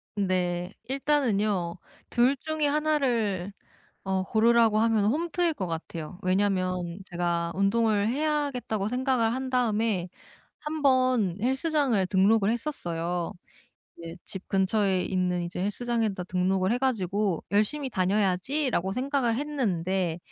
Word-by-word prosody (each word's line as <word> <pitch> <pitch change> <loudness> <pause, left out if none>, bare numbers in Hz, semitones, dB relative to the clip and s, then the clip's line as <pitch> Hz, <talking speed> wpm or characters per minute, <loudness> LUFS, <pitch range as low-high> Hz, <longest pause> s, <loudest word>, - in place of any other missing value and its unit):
네. 180 -2 -1
일단은요. 215 -11 0 0.3
2 250 +3 +3
중에 315 +1 -2
1 305 +1 +1
를 210 -8 -1 0.5
어 190 0 0
고르라고 225 +1 +3
하면 220 -2 +3
홈트일 335 - +1
것 195 -10 -4
같아요. 165 +1 -6
왜냐하면 185 -2 0
제가 170 -1 -1
운동을 210 +1 +2
해야겠다고 275 -7 -1
생각을 250 -2 +1
한 260 0 -3
다음에 220 -7 +1 0.5
한번 255 - +1
헬스장을 265 - +1
등록을 200 +2 +3
했었어요. 175 - -3 0.7
이제 165 0 -8
집 190 -1 -9
근처에 195 -1 +1
있는 180 -2 0
이제 175 +1 -5
헬스장에다 215 -1 -1
등록을 185 +2 +1
해 245 - +1
가지고 205 -7 0
'열심히 265 +8 +1
다녀야지.'라고 195 - 0
생각을 255 -2 0
했는데 190 - -1
210 Hz, 275 characters per minute, -27 LUFS, 185-255 Hz, 0.7 s, 2